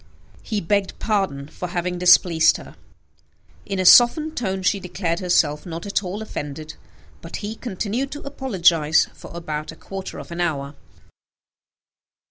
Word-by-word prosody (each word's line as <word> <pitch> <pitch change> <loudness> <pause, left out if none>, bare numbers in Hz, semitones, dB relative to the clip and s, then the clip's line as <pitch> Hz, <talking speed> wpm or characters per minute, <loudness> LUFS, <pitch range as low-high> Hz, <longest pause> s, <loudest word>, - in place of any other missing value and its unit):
He 210 -3 -3
begged 200 +2 0
pardon 195 -11 -1
for 180 - -6
having 175 0 -3
displeased 175 -2 +5
her. - - -12 0.9
In 195 - -2
a 185 - 0
softened 300 - +6
tone 190 -5 -2
she 200 +2 +2
declared 180 -2 -3
herself 160 -5 +1
not 165 0 -7
at 200 0 0
all 200 +3 -5
offended; 155 -5 -6 0.5
but 165 - -8
he 210 +1 -4
continued 230 +3 -3
to 290 - -8
apologize 175 - +2
for - - -12
about 155 -3 -5
a - - -12
quarter 195 -1 -7
of - - -9
an 170 +1 -3
hour. 145 -4 -2
180 Hz, 145 wpm, -22 LUFS, 165-205 Hz, 0.9 s, softened